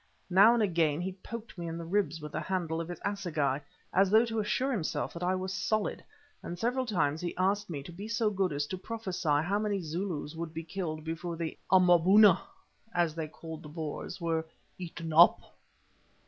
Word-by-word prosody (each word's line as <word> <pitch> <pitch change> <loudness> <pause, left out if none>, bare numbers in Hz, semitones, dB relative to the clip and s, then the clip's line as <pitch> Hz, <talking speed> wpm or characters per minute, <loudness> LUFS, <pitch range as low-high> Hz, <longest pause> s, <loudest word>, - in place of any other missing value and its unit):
Now 205 +6 +7
and 230 - +2
again 165 -6 +2
he 185 +2 -2
poked 215 +1 -9
me 170 - -4
in 165 0 -4
the 170 - -6
ribs 190 -2 0
with 150 -1 -8
the - - -2
handle 170 -4 -2
of 165 - -5
his 175 - -6
assegai, 150 -9 -1 0.3
as 195 +1 +4
though 220 +3 +6
to 225 -1 -2
assure 255 +6 0
himself 195 -11 -2
that 170 - -7
I 180 +1 +1
was 185 0 -3
solid, 215 +3 -1 0.4
and 175 - -6
several 250 +5 0
times 160 -8 0
he 175 - -4
asked 195 +2 +1
me 145 -5 -5
to 160 - -9
be 195 +5 -7
so 225 -1 +1
good 195 -2 0
as 145 0 -1
to 185 +5 -5
prophesy 195 -6 -4
how 200 +5 0
many 210 -2 0
Zulus 165 -2 -4
would 165 -1 -6
be 165 - -4
killed 160 -3 -4
before 165 +1 -4
the 165 -1 -3 0.2
"Amaboona," 185 +2 +6 0.5
as 170 -3 +2
they 160 -1 -4
called 160 0 -9
the 150 - -10
Boers, 160 +4 -5
were 165 -2 0 0.4
"eaten 165 -2 -6
up." 170 +3 +7
175 Hz, 200 wpm, -30 LUFS, 160-200 Hz, 0.5 s, Now